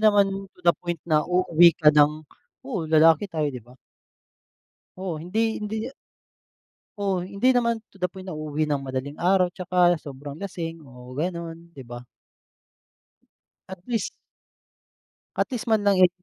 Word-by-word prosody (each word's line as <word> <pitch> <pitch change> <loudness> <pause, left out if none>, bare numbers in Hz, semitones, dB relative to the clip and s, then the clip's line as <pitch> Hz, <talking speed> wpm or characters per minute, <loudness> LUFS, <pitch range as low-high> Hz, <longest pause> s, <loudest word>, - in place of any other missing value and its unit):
naman 200 -2 +3
to - - -19
the 170 - +6
point 175 -3 -5
na 155 -3 +3
uuwi 175 -2 +5
ka 150 -2 +5
ng 150 +1 +3 0.4
oo, 195 -12 -4
lalaki 160 +4 +5
tayo, 160 -3 -1
'di 125 - -7
ba? 125 +3 -19 1.2
Oo, 185 -4 -4
hindi 220 +6 -1
hindi 210 +1 -3 1.2
Oo, 195 -2 0
hindi 200 +8 +1
naman 235 -2 +2 0.2
to 195 - -20
the 180 - +1
point 185 +1 -11
na - - -4
uuwi 155 0 -2
nang 145 -2 -1
madaling 135 +2 -5
araw 180 0 +3
'tsaka 180 -2 +2
sobrang 140 0 -8
lasing 165 -4 -5
o 125 -3 -13
gano'n, 170 +1 -5
'di 135 - -9
ba? 120 +1 -8 1.7
At 190 - -7
least 235 -3 -1 1.3
At - - +1
least 245 0 -4
man 215 -2 +2
lang, 195 -2 +4
eh 180 - +8
175 Hz, 150 wpm, -25 LUFS, 155-195 Hz, 1.7 s, eh